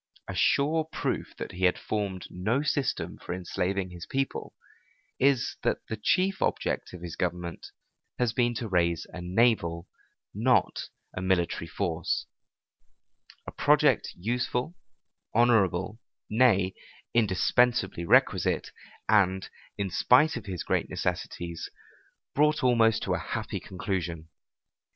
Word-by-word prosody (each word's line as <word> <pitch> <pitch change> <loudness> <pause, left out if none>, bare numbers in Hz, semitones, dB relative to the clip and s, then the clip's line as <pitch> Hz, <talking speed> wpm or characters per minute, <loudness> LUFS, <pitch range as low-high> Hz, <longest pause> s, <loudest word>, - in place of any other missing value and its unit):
A - - -4
sure 155 +3 +2
proof 160 - -3
that - - -5
he 95 +1 0
had 90 - +3
formed 100 -4 -3
no 110 +10 0
system 145 -3 -1
for 90 - -5
enslaving 95 +1 -2
his 90 0 -9
people 135 0 -3 0.6
is, 135 -2 +2
that - - -1
the 110 - -2
chief 185 - +1
object - - -1
of 90 -1 -9
his 85 -2 -6
government 90 -1 -3 0.5
has 120 -2 +1
been 120 -1 +1
to 115 0 -3
raise 85 -4 +1
a 90 - -6
naval, 90 -3 +1 0.5
not 120 +5 +1 0.3
a 90 - -3
military 90 -3 0
force; 85 -1 -2 1.2
a - - -6
project - - +3
useful, 125 - -2 0.6
honorable, 105 -3 +3 0.3
nay, 105 -5 +4 0.4
indispensably 115 -1 +2
requisite, 85 - +3 0.4
and, 95 -3 +3 0.3
in 100 -2 -2
spite 145 - +4
of 120 - -6
his 90 -4 -4
great - - 0
necessities, 85 -1 -3 0.6
brought 150 0 +3
almost 115 -3 +4
to - - 0
a - - 0
happy - - -4
conclusion. 85 -4 -4
100 Hz, 125 wpm, -28 LUFS, 90-125 Hz, 1.2 s, nay